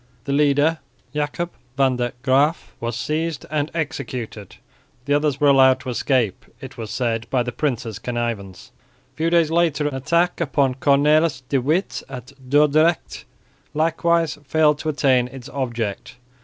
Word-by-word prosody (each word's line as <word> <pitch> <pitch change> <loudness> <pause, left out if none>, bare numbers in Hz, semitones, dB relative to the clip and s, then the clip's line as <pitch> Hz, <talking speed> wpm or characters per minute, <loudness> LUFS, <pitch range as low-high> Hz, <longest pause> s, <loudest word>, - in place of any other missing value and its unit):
The 140 - -2
leader, 145 +2 +3 0.3
Jacob 150 +4 -2 0.3
van 135 -2 +3
der 120 -1 -2
Graeff, 140 +4 +2
was 115 0 -3
seized 155 +3 -2
and 150 0 0
executed; 125 - -5 0.5
the 145 - +1
others 145 -2 +1
were 145 -1 +4
allowed 130 -1 +5
to 130 - -6
escape, 125 -4 0 0.2
it 130 -2 -10
was 110 -2 -7
said 115 -2 -2
by 130 -2 +1
the 125 - -4
prince's 120 -7 -3
connivance. 115 -6 -4 0.4
A - - -38
few 165 +2 +1
days 165 -2 +3
later 165 -3 +2
an 145 - -3
attack 170 +7 0
upon 140 -4 +1
Cornells 145 +1 +3
de 135 - +2
Witt 160 +9 0
at 130 0 -9 0.2
Dordrecht 150 +3 +2 0.5
likewise 165 0 +1
failed 150 +1 +2
to 155 - -2
attain 130 -4 +2
its 130 0 -10
object. 120 -6 -4
140 Hz, 150 wpm, -21 LUFS, 125-155 Hz, 0.5 s, allowed